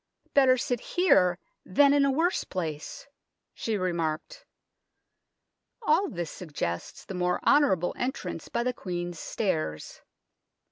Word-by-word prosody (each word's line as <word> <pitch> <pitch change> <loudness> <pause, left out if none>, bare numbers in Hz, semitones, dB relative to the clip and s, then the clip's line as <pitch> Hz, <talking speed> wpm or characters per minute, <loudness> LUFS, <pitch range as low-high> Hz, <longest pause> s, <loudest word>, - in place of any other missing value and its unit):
" - - -40
Better 260 -2 +5
sit 245 -1 -1
here 180 - +3 0.3
than 280 +9 +4
in 285 -1 +4
a - - +3
worse 330 +6 +1
place," 160 -5 -5 0.5
she 220 -2 -2
remarked. 175 - -2 1.4
All 380 +2 +3
this 175 -3 -4
suggests 145 - -5
the - - -7
more 180 0 0
honourable 190 - +4
entrance 255 +2 -4
by 235 - -1
the 250 +1 0
Queen's 175 -5 -5
Stairs. 155 - -3
185 Hz, 125 wpm, -28 LUFS, 175-275 Hz, 1.4 s, Better